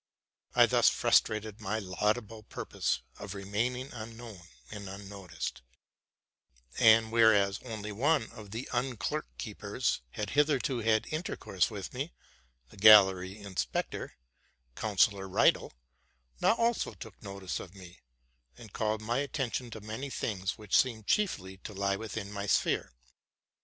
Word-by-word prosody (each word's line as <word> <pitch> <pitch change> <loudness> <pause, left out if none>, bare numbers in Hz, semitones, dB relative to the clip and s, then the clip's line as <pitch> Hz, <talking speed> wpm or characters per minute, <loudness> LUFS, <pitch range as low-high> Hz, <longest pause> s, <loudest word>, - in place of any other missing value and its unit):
I - - +8
thus - - +5
frustrated 110 0 +1
my 105 +1 -1
laudable 105 +3 -1
purpose - - -3 0.2
of 100 0 -7
remaining 115 +7 -2
unknown 115 -3 -9 0.3
and 100 -2 -7
unnoticed; 95 -3 -6 1.2
and 110 -1 +6
whereas 110 -4 +4
only 110 -4 -6
one 135 +3 +1
of 110 -3 -11
the 115 +5 -5
underkeepers 115 - -2
had 105 - -4
hitherto 145 -3 +2
had 110 -1 +2
intercourse 155 - -1
with 100 -4 -7
me, 140 +6 -4 0.6
the - - -16
gallery 95 -2 +7
inspector, 100 -3 -3 0.6
Counsellor 100 -2 +2
Riedel, - - +3 0.7
now - - +4
also 230 0 0
took 110 -5 -11
notice 100 -2 -5
o1 90 +1 -10
me, 90 -1 -13 0.6
and 110 -4 -13
called 110 0 -1
my 120 +4 0
attention 130 -3 -2
to 110 -1 -8
many 110 +7 -5
things 100 -6 -3
which 105 -3 -2
seemed 115 -5 +2
chiefly 95 - 0
to 100 +2 -9
lie 100 0 +1
within 105 -1 -5
my 100 0 -4
sphere. - - +1
110 Hz, 125 wpm, -31 LUFS, 100-115 Hz, 1.2 s, I